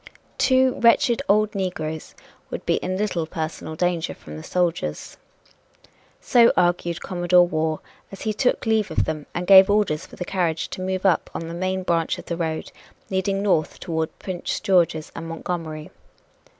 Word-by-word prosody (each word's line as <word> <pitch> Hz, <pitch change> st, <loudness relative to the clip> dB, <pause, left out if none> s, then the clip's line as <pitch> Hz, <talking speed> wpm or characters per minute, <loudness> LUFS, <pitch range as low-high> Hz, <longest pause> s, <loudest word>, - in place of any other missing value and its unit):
Two 260 Hz, -1 st, +3 dB
wretched 235 Hz, +1 st, +4 dB
old 210 Hz, +1 st, +3 dB
negroes 160 Hz, -5 st, -4 dB, 0.3 s
would -, -, -6 dB
be -, -, +2 dB
in 185 Hz, 0 st, -3 dB
little 185 Hz, -6 st, -1 dB
personal 160 Hz, -1 st, -5 dB
danger 175 Hz, 0 st, -1 dB
from 75 Hz, -, -11 dB
the 80 Hz, -, -7 dB
soldiers. 170 Hz, -, -2 dB, 1.0 s
So 235 Hz, -1 st, +5 dB
argued 175 Hz, -1 st, +1 dB
Commodore 175 Hz, -1 st, +3 dB
Waugh 155 Hz, -1 st, -1 dB, 0.3 s
as 195 Hz, -, -10 dB
he 215 Hz, -, 0 dB
took 250 Hz, +4 st, 0 dB
leave 220 Hz, -3 st, +2 dB
of 160 Hz, -, 0 dB
them 155 Hz, -2 st, -4 dB
and 175 Hz, -, -2 dB
gave 190 Hz, 0 st, +8 dB
orders 195 Hz, -5 st, +1 dB
for -, -, -13 dB
the 180 Hz, -, -5 dB
carriage 170 Hz, -4 st, -1 dB
to -, -, -6 dB
move 185 Hz, +1 st, -2 dB
on 190 Hz, -, +7 dB
up -, -, -2 dB
the 165 Hz, 0 st, -5 dB
main 185 Hz, +2 st, -2 dB
branch 165 Hz, -2 st, 0 dB
of -, -, -10 dB
the 170 Hz, -, -3 dB
road 160 Hz, -2 st, -3 dB, 0.4 s
leading 195 Hz, +1 st, 0 dB
north 175 Hz, -6 st, +1 dB
toward 160 Hz, -1 st, -3 dB
Prince 185 Hz, -2 st, -4 dB
George's 170 Hz, -5 st, +1 dB
and 165 Hz, 0 st, -6 dB
Montgomery. 165 Hz, -2 st, -5 dB
175 Hz, 165 wpm, -23 LUFS, 160-195 Hz, 1.0 s, gave